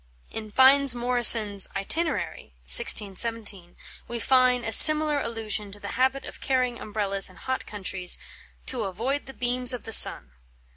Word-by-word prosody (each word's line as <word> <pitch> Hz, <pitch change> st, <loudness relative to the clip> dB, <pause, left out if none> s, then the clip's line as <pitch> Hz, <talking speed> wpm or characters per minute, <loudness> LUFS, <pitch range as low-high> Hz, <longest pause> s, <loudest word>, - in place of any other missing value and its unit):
In 215 Hz, -1 st, -9 dB
Fynes 265 Hz, +2 st, +2 dB
Moryson's 235 Hz, -5 st, +3 dB
"Itinerary" 195 Hz, -, -4 dB
(1617) 200 Hz, -, +1 dB, 0.3 s
we 235 Hz, -, -7 dB
find 255 Hz, 0 st, 0 dB
a 225 Hz, -, -5 dB
similar 305 Hz, +3 st, +5 dB
allusion 215 Hz, -3 st, -6 dB
to 205 Hz, -, -6 dB
the 200 Hz, -, -10 dB
habit 260 Hz, +2 st, -3 dB
of -, -, -13 dB
carrying 255 Hz, -3 st, -3 dB
Umbrellas 200 Hz, -2 st, -3 dB
in 185 Hz, -, -19 dB
hot 260 Hz, 0 st, -7 dB
countries 190 Hz, -3 st, -1 dB, 0.5 s
"to 260 Hz, -, -2 dB
auoide 230 Hz, +9 st, -6 dB
the 270 Hz, -, -11 dB
beames 250 Hz, +1 st, -1 dB
of 245 Hz, -, -12 dB
the 225 Hz, -, -10 dB
sunne." 65 Hz, -, +5 dB
230 Hz, 145 wpm, -23 LUFS, 205-260 Hz, 0.5 s, similar